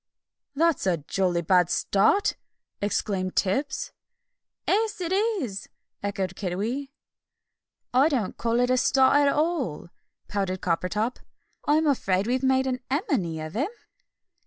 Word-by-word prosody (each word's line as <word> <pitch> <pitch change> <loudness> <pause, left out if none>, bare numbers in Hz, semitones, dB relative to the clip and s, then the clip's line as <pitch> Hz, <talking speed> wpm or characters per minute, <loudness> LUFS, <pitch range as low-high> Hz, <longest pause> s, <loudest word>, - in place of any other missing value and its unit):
"That's 325 -7 +2
a 175 -2 +2
jolly 175 +3 -1
bad 180 0 +4
start!" 215 - +2 0.5
exclaimed 195 -2 -1
Tibbs. 270 +9 0 0.8
"'Es, 435 0 +1
it 350 -1 -3
is!" 380 - -1 0.3
echoed 195 -2 -2
Kiddiwee. 215 +10 -3 1.0
"I 270 +5 +5
don't 245 -10 -1
call 230 0 0
it 245 0 +2
a 255 - +3
start 265 +2 +4
at 290 0 +4
all," 295 - -1 0.4
pouted 195 -2 -2
Coppertop. 185 +7 -1 0.5
"I'm 310 +2 +3
afraid 195 -9 +1
we've 250 +2 0
made 265 0 +3
an 255 -1 -1
emeny 240 - -1
of 155 - -8
him." 275 - 0
240 Hz, 125 wpm, -26 LUFS, 185-285 Hz, 1.0 s, I